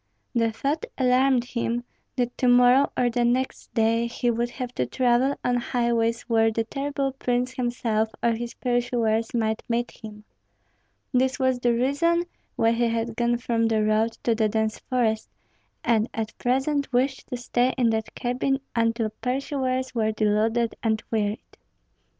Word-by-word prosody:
The 230 -2 +2
thought 280 +8 -2
alarmed 255 -1 +3
him, 240 -1 -2 0.3
that 245 -1 -1
to 255 - +2
morrow 245 +3 +5
or 245 -1 +2
the 240 +1 +1
next 250 +2 -1
day 230 +1 +2
he 240 0 0
would 235 +1 -1
have 250 0 -6
to 125 - -1
travel 250 - +2
on 245 0 +1
highways 235 -1 0
where 225 -1 +2
the 225 +1 0
terrible 275 +3 -2
prince 250 -1 -1
himself 235 -3 -1
or 235 - +4
his 235 +1 -4
pursuers 240 -3 0
might 220 -1 0
meet 240 +1 0
him. 210 -1 -11 0.9
This 260 +1 +2
was 260 -2 +1
the 240 -1 +2
reason 285 +8 +2 0.3
why 225 - +3
he 235 +1 +1
had 230 0 -2
gone 240 0 +1
from 230 -1 0
the 220 -1 +1
road 215 +2 +2
to 235 - +2
the 220 -1 +1
dense 220 0 -1
forest, 230 -4 -1 0.5
and 230 -1 +2
at 225 0 -3
present 275 +3 0
wished 260 +2 0
to 250 - -4
stay 245 +1 +1
in 240 -3 +3
that 220 -1 -3
cabin 255 +2 0 0.2
until 230 -1 +1
pursuers 260 0 -1
were 220 -2 +1
deluded 220 +2 +1
and 220 -1 0
wearied. 210 -1 -2
240 Hz, 160 wpm, -25 LUFS, 225-255 Hz, 0.9 s, morrow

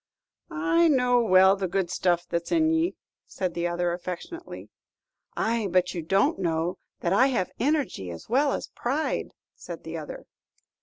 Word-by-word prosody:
"I 335 0 +2
know 250 -4 +3
well 190 -3 +6
the 195 -1 -2
good 180 -1 -1
stuff 175 -1 +1
that's 170 0 -3
in 320 -1 +3
ye," 325 +2 +1 0.3
said 185 -3 -3
the 170 0 -1
other, 175 0 -1
affectionately. 185 - -7 0.7
"Ay, 225 -2 0
but 180 0 +2
you 170 - -3
don't 195 +5 +2
know 170 -1 -1 0.2
that 175 - +1
I 255 +7 +5
have 240 -9 -1
energy 275 - 0
as 85 -1 -9
well 275 +4 +2
as - - -4
pride," 280 +6 -2 0.2
said - - -9
the - - -5
other. - - -8
195 Hz, 160 wpm, -26 LUFS, 175-290 Hz, 0.7 s, well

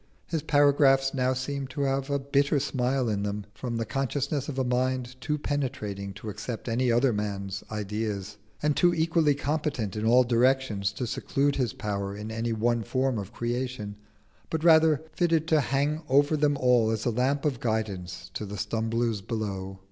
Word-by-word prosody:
His 165 -3 -2
paragraphs 140 -2 +4
now 130 -1 +1
seem 135 +1 -3
to 130 +2 -5
have 135 0 0
a 140 - +1
bitter 140 +1 +1
smile 130 -2 0
in 105 -2 0
them, 105 0 -3
from 120 -2 -4
the 115 - -1
consciousness 135 +4 -2
of 135 - -5
a 130 - +2
mind 125 0 -1
too 150 +3 -1
penetrating 125 -10 -3
to 105 +2 -7
accept 110 +4 -6
any 120 +1 +1
other 120 +1 +3
man's 100 -2 -3
ideas, 105 -1 -3 0.3
and 150 -1 +2
too 175 -1 +4
equally 160 -2 +2
competent 140 -8 -2
in 105 - -3
all 120 +3 +6
directions 120 -4 +2
to 125 - -3
seclude 140 +4 0
his 125 -5 0
power 100 -1 -3
in 105 +1 -6
any 115 +1 -2
one 115 +1 +1
form 130 +1 0
of 100 0 -7
creation, 120 -3 -3 0.5
but 160 -1 -2
rather 160 -2 +5
fitted 165 -3 +1
to 155 -2 +4
hang 145 +4 0
over 145 +3 +4
them 145 -1 +2
all 125 -4 +4
as 110 -1 -2
a 120 - +2
lamp 135 +5 0
of 135 -6 0
guidance 100 -6 -3
to 105 - -4
the 105 +1 -6
stumblers 110 +1 -1
below. 95 -3 -4
125 Hz, 180 wpm, -27 LUFS, 110-140 Hz, 0.5 s, all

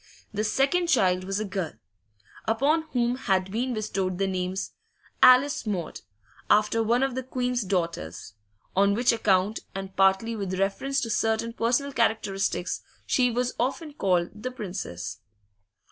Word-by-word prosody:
The 210 +1 -1
second 275 +10 +2
child 185 - +3
was 195 +1 -2
a 215 - -2
girl, 190 -5 -3 0.7
upon 290 +8 +2
whom 245 0 +1
had 190 -6 0
been 245 +3 -1
bestowed 195 -4 -2
the 195 - +1
names 185 0 -2 0.5
Alice 255 -1 +6
Maud, 185 -6 -3 0.5
after 210 +2 +4
one 235 +4 +2
of 270 -1 0
the 260 - -2
Queen's 250 -1 -1
daughters; 170 - -3 0.4
on 200 +1 +4
which 245 +3 +3
account, 210 -2 +2 0.2
and 195 0 -6
partly 195 +4 +3
with 190 -3 -3
reference 270 +8 0
to 230 -3 -2
certain 225 +2 0
personal 245 +5 0
characteristics, 200 -6 0 0.2
she 250 -1 +3
was 245 +1 -1
often 290 +5 -2
called 180 -9 +1
'the 210 +5 -5
Princess. 175 - -6
215 Hz, 145 wpm, -26 LUFS, 190-250 Hz, 0.7 s, Alice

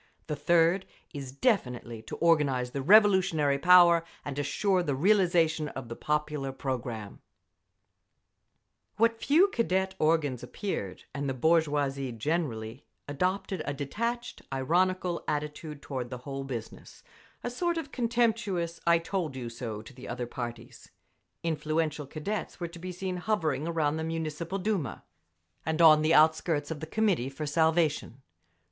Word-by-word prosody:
The 150 - -3
third 170 +5 +3 0.3
is 135 -3 -6
definitely 125 - -1
to 110 - -7
organise 140 -7 +2
the 140 - -3
revolutionary 185 -6 +5
power 175 -1 +7 0.2
and 145 -1 -4
assure 185 +6 +1
the 145 -6 -1
realisation 170 -3 +3
of 130 -4 -7
the 115 - -5
popular 150 -2 -2
programme… 120 -6 -5 1.8
What 230 +1 +2
few 340 +8 +5
Cadet 190 - 0
organs 155 -5 +1
appeared, 125 - -5
and 140 -1 -2
the 135 - -2
bourgeoisie 145 -3 +1
generally, 115 -2 -2 0.2
adopted 180 +4 -1
a 145 - -3
detached, 230 - -3
ironical 175 +6 +1
attitude 150 0 -4
toward 130 -3 -4
the 125 - -5
whole 135 +2 -6
business, 120 -5 -8 0.4
a 245 - -3
sort 345 +6 -1
of 300 -4 -5
contemptuous 225 -8 0
"I—told—you—so" 130 - -1
to 115 - -13
the 130 0 -11
other 125 - -3
parties. 120 -1 -7 0.5
Influential 155 -2 -1
Cadets 180 +11 -4
were 175 - -3
to 170 +1 -11
be 185 +2 -5
seen 185 0 -4
hovering 165 -7 -1
around 160 -2 0
the 160 - -3
Municipal 165 +2 -3
Duma, 190 - -2 0.6
and 160 +1 -2
on 155 -2 +8
the 160 +2 +3
outskirts 155 -1 +3
of 155 - -4
the 160 - -6
Committee 190 - +1
for 145 +3 -5
Salvation. 155 -3 +1
155 Hz, 135 wpm, -29 LUFS, 135-180 Hz, 1.8 s, on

